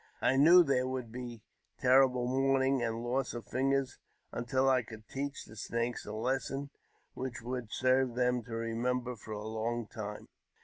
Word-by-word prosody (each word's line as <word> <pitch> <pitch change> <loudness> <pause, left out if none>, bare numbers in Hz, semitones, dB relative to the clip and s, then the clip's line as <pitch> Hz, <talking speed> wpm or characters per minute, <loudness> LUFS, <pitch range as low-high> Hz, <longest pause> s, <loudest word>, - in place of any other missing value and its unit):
I 130 - +3
knew 170 +6 +8
there 130 -4 +1
would 130 -3 -4
be 120 -2 -7 0.3
terrible 130 -1 +4
mourning 135 +1 +2
;nd 115 -1 -2
loss 125 +1 -1
of 120 - -6
fingers, 135 0 0 0.3
until 130 +3 0
I 130 -1 +4
could 110 -1 -12
teach 140 +1 -4
the 110 - -13
Snakes 115 +2 -3
a - - -4
lesson 135 +4 -2 0.4
l^hich 130 -2 -5
would 125 -2 -4
serve 130 -1 +2
them 125 0 +2
to 115 -1 -6
remember 120 +2 -1
for 110 0 -8
a 105 +1 -5
long 115 +1 -2
time. 105 -1 -7
125 Hz, 165 wpm, -32 LUFS, 115-130 Hz, 0.4 s, knew